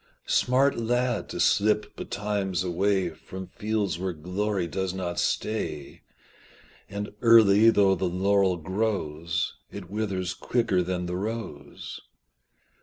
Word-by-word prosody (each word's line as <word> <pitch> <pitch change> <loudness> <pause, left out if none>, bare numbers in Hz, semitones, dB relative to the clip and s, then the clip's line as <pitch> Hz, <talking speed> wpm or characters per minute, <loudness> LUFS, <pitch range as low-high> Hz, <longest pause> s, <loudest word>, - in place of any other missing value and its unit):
Smart 130 +1 +2
lad, 120 0 0
to - - -5
slip 105 +1 +2
betimes 100 -3 -2
away 95 0 +1
From 95 +4 -9
fields 105 -1 -2
where 95 -1 -2
glory 90 +4 -2
does 95 +2 -3
not 90 -2 -3
stay 75 -10 -2 0.9
And 100 +1 -5
early 115 -2 +7
though 100 -3 +4
the 95 -1 -1
laurel 95 0 +2
grows 85 -3 -2 0.2
It 100 -3 -9
withers 95 -4 -2
quicker 115 -7 0
than 90 0 -2
the 90 0 -3
rose. 100 -9 -6
95 Hz, 115 wpm, -26 LUFS, 90-105 Hz, 0.9 s, early